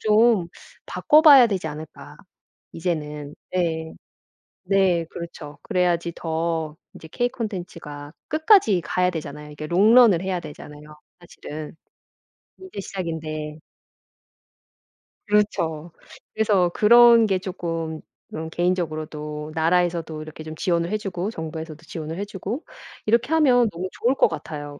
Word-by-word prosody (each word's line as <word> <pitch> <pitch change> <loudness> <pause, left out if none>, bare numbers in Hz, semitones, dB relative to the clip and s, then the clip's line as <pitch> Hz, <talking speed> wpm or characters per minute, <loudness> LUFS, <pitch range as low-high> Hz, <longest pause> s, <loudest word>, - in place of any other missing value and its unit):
좀 215 -4 +3 0.4
바꿔봐야 295 -5 +6
되지 190 -6 -2
않을까 150 -1 -10 0.6
이제는. 150 -4 -4 0.2
네. 160 -3 -1 0.7
네 185 -3 +2
그렇죠. 160 -4 -9
그래야지 175 -4 0
더 160 -2 -2 0.2
이제 160 - -12
K 245 0 0
콘텐츠가 170 - -7 0.2
끝까지 310 - +4
가야 180 +2 +1
되잖아요. 150 -2 -7
이게 150 +1 -7
롱런을 205 +2 +6
해야 190 -2 -2
되잖아요 150 -1 -11 0.3
사실은. 155 -3 -9 0.8
인제 375 - -9
시작인데. 155 -5 -5 1.7
그렇죠. 175 -6 0 0.4
그래서 205 -5 +2
그런 235 +4 +7
게 195 -3 +1
쪼끔 165 -4 -4 0.3
어 160 +1 -5
개인적으로도 155 -3 -3
나라에서도 165 -1 0
이렇게 155 0 -9
좀 155 0 -8
지원을 170 -1 0
해 215 - 0
주고 195 0 -4
정부에서도 160 -2 -7
지원을 160 0 -6
해 200 - -2
주고 205 - -5 0.4
이렇게 235 +7 +2
하면 250 -7 +4
너무 185 0 -5
좋을 250 +3 0
것 - - +4
같아요. 145 -2 -7
170 Hz, 280 characters per minute, -23 LUFS, 155-205 Hz, 1.7 s, 그런